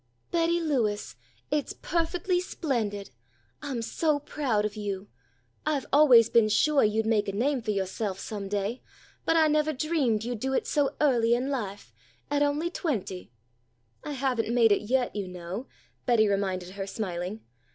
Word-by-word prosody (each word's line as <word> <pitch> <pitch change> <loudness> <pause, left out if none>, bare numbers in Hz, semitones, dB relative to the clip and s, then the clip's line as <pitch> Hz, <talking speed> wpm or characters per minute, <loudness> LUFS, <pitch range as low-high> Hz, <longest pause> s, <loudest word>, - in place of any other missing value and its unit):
"Betty 340 0 +2
Lewis, 245 -11 -1 0.4
it's 295 -2 0
perfectly 350 +2 -1
splendid! 220 - -3 0.5
I'm 255 -5 -3
so 305 +5 +1
proud 270 -7 -1
of 210 0 -3
you 205 -2 -4 0.5
I've 300 -3 0
always 260 -6 +7
been 230 -2 +4
suah 285 +6 +3
you'd 215 +1 +2
make 220 -2 +2
a - - 0
name 255 +6 0
for 225 - -6
yoahself 195 0 -2
some 200 -1 -5
day, 205 +4 -2 0.4
but 325 - +3
I 320 -1 +5
nevah 305 0 +2
dreamed 270 -7 0
you'd 240 -1 -3
do 265 +3 -1
it - - +1
so 290 -2 +1
early 240 -5 +3
in 260 +3 -1
life, 200 - -5 0.4
at 290 0 +2
only 295 +4 +1
twenty!" 205 - -3 0.7
"I 295 - -4
haven't 250 -4 0
made 235 -2 +5
it 200 - +3
yet, 245 +3 0
you 200 -2 -3
know," 180 +7 -6 0.4
Betty 225 -3 +4
reminded 190 -3 -1
her 195 0 -5
smiling. 195 -1 -4
235 Hz, 160 wpm, -28 LUFS, 205-290 Hz, 0.7 s, always